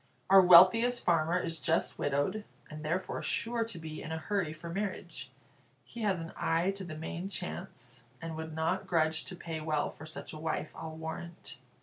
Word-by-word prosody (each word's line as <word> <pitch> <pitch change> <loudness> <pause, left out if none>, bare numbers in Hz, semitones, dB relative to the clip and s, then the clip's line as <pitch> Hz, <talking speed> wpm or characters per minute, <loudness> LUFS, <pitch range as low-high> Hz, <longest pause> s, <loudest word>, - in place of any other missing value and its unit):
Our 195 0 +10
wealthiest 185 +8 +7
farmer 170 0 +3
is 165 -2 -3
just 165 0 0
widowed, 145 +9 0 0.3
and 155 0 -7
therefore 175 +5 -2
sure 230 +1 0
to 225 -6 -6
be 160 -1 -7
in 160 - -6
a 160 - -1
hurry 180 -1 -1
for 155 +2 -9
marriage. 195 +3 -4 0.5
He 235 - -9
has 200 -4 +1
an 165 0 -7
eye 165 +4 +1
to 195 0 -7
the 165 -4 -7
main 170 +4 -4
chance, 135 -10 -5 0.2
and 165 -1 -5
would 160 0 -6
not 165 +4 0
grudge 160 -2 +2
to 185 - -6
pay 165 -2 -5
well 155 -1 0
for 155 - -11
such 160 - -7
a 155 - -7
wife, 155 -1 -2
I'll 160 -1 -6
warrant." 160 +1 -7
165 Hz, 190 wpm, -32 LUFS, 155-185 Hz, 0.5 s, Our